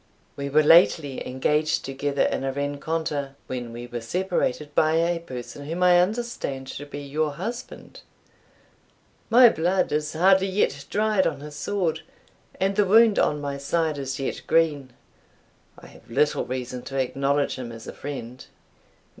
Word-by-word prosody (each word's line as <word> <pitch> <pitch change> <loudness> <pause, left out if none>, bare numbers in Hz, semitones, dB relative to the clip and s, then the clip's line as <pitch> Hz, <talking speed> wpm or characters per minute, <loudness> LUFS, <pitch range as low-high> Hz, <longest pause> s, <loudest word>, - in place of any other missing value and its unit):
We 140 0 -4
were 155 +2 +4
lately 155 -3 +4
engaged 150 +4 0
together 140 +1 -1
in - - -1
a 135 - -1
rencontre, 145 0 -3
when 125 -2 -5
we 120 +1 -7
were 120 -1 -6
separated 150 0 -2
by 155 +1 +3
a 170 +1 +1
person 130 -2 -8
whom 170 +3 -2
I 175 -1 +6
understand 195 - -3
to 145 - -7
be 145 0 -7
your 145 +1 -2
husband. 235 - -7 1.3
My 245 +2 +8
blood 180 +1 0
is 150 0 -1
hardly 190 +3 +4
yet 185 -7 0
dried 210 -2 +2
on 145 -3 -4
his 150 0 -9
sword, 185 -4 -1 0.6
and 195 +1 +1
the 205 - +3
wound 220 +2 +5
on 150 - +1
my 140 -1 -4
side 155 +1 -1
is 135 0 -4
yet 135 - -3
green. 150 -5 +1 0.9
I - - -14
have - - -17
little 145 +6 +1
reason 125 0 -5
to 135 - -5
acknowledge 140 +2 0
him 125 -2 -6
as 115 -1 -10
a - - -7
friend." 130 -3 -7
150 Hz, 155 wpm, -24 LUFS, 135-175 Hz, 1.3 s, My